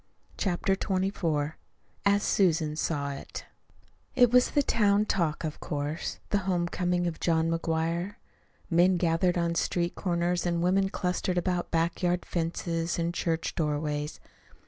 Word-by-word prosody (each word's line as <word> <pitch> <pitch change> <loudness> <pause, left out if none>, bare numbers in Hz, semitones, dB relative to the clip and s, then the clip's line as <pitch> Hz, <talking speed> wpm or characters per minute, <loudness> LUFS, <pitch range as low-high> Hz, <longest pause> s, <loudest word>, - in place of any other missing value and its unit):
CHAPTER 195 0 0
XXIV 185 -7 -1 0.5
AS 200 +1 +3
SUSAN 165 -5 +2
SAW 145 -3 -1
IT 140 - -7 0.7
It 245 -2 +5
was 250 0 +5
the 290 - +2
town 210 -4 +3
talk, 170 -7 0
of 155 -2 -4
course 145 +2 -3
the 205 - +3
home 175 -2 +1
coming 175 0 0
of 170 -2 -3
John 165 -1 +1
McGuire. 165 +3 -1 0.5
Men 180 +2 +4
gathered 175 +1 +2
on 170 -1 +1
street 170 +1 0
corners 175 -1 0
and 170 -1 0
women 195 +2 +2
clustered 180 -1 -1
about 175 0 0
back 165 +1 0
yard 180 0 +1
fences 165 0 -2
and 170 0 -1
church 165 -1 -1
doorways. 150 -1 -2
175 Hz, 140 wpm, -28 LUFS, 165-185 Hz, 0.7 s, It